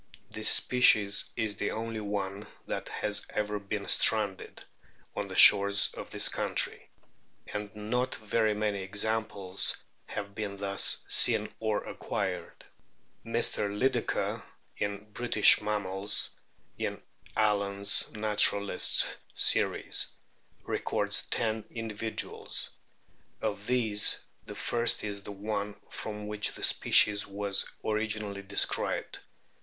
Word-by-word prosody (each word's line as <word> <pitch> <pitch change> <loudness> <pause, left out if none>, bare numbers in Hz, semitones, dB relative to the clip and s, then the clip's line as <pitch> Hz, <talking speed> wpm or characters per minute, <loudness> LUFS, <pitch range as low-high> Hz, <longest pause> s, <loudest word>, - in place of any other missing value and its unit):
This 110 0 +6
species 105 -5 +5
is 105 -2 -3
the - - -2
only 115 0 -5
one 100 -1 -5 0.2
that - - -5
has 105 -1 -3
ever 105 0 -3
been 100 0 -6
stranded 105 -4 +2 0.5
on 105 - -4
the 95 - -8
shores 100 0 +6
of - - -9
this - - +1
country; - - -3 0.6
and 105 0 -5
not 125 +5 -2
very 110 0 -1
many 105 -2 -2
examples 100 -1 -1 0.3
have 100 -1 -7
been 100 -1 -6
thus 100 0 +1
seen - - +3
or 110 -2 -2
acquired. - - -6 0.6
Mr. 100 - 0
Lydekker, 105 +7 -2 0.3
in 100 +1 -5
British 120 -3 +5
Mammals, 100 -1 0 0.5
in - - -4 0.4
"Allen's 100 -2 +3
Naturalists' 105 -2 +4 0.2
Series," - - +1 0.6
records - - -2
ten 110 -2 -2
individuals. 115 -1 -3 0.7
Of 105 -1 -5
these 115 -5 +3 0.3
the - - -9
first 120 0 0
is 100 -1 -5
the 100 - -9
one 100 0 -5 0.2
from 105 -1 -6
which 105 0 -2
the - - -9
species 105 -1 +3
was 100 0 -2 0.2
originally 110 -2 -2
described. 100 +1 -1
105 Hz, 110 wpm, -28 LUFS, 100-110 Hz, 0.7 s, This